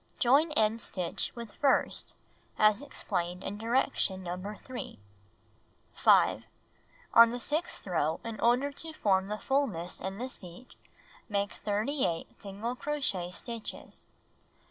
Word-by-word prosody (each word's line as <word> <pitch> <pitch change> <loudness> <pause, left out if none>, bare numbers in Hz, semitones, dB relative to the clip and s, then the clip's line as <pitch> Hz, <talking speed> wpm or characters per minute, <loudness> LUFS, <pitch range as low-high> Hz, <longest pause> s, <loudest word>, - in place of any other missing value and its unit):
Join 285 +6 +4
end 220 -3 +3
stitch 180 -4 -1
with 235 -3 -8
first 280 - +1 0.4
as 215 +2 +5
explained 180 -10 -3
in 205 +2 -5
direction 225 -5 +1
No. 185 +4 -5
3. 255 - -6 1.0
5. - - +4 0.7
On 230 0 +9
the 245 +1 -4
sixth 310 +8 -1
row, 160 -4 0
in 225 -2 -6
order 250 +5 +3
to 320 +3 -7
form 190 -8 +2
the 210 +1 -3
fullness 220 -11 -1
in 190 +1 -4
the 250 +3 -3
seat, 185 -1 -10 0.6
make 200 -1 0
38 210 - -2
single 205 +5 -4
crochet 255 -12 -2
stitches. 230 +4 -6
215 Hz, 120 wpm, -30 LUFS, 190-255 Hz, 1.0 s, On